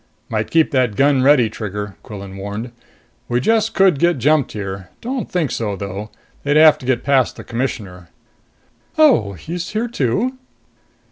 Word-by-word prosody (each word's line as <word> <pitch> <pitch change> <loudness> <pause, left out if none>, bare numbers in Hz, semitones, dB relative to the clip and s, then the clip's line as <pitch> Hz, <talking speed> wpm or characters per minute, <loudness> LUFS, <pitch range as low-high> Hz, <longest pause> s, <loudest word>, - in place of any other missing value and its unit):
"Might 110 -1 -2
keep 165 -1 +3
that 125 -6 +1
gun 140 +1 +3
ready, 135 -3 +5
Trigger," 105 -2 -6
Quillan 100 -2 -9
warned. 100 +5 -6 0.6
"We 120 - +1
just 225 - +1
could 190 -7 +4
get 170 0 +3
jumped 145 +2 +2
here. 95 -2 -6
Don't 250 -2 -4
think 165 -7 0
so, 105 -3 -2
though. 100 +2 -6 0.3
They'd 145 +1 +2
have 155 0 +7
to 125 - -9
get 130 -2 +1
past 135 -2 +2
the - - -9
Commissioner." 105 -8 -4 0.9
"Oh, 265 - +4
he's 170 - -6
here, 225 +2 -1
too?" 240 - -1
130 Hz, 155 wpm, -19 LUFS, 105-165 Hz, 0.9 s, have